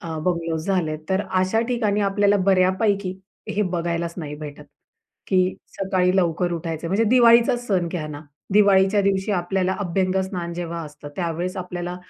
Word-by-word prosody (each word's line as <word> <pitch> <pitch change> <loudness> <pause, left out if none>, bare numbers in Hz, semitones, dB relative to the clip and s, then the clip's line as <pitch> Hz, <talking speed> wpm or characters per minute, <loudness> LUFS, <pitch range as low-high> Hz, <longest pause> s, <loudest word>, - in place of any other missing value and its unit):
अ, 165 -3 -5
bungalows 165 -1 -2
झालेत, 170 -6 0
तर 190 +1 +1
अशा 185 +4 +1
ठिकाणी 215 -4 0
आपल्याला 205 0 +2
बऱ्यापैकी 190 0 +2 0.3
हे 210 0 0
बघायलाच 170 -2 -2
नाही 150 -4 -5
भेटत, 150 -1 -9 0.6
की 185 -1 +2 0.2
सकाळी 185 -1 +1
लवकर 175 -1 +1
उठायचंय. 165 -1 -4
म्हणजे 205 +5 +2
दिवाळीचाच 240 0 +5
सण 180 -5 +1
घ्या 165 -3 -4
ना. 145 -1 -7 0.3
दिवाळीच्या 200 0 +5
दिवशी 195 +1 0
आपल्याला 185 +1 0
अभ्यंगस्नान 185 -1 -1
जेव्हा 170 -1 -4
असतं, 150 0 -11
त्यावेळेस 175 +1 -3
आपल्याला 180 -1 -5
185 Hz, 145 wpm, -23 LUFS, 170-195 Hz, 0.6 s, दिवाळीचाच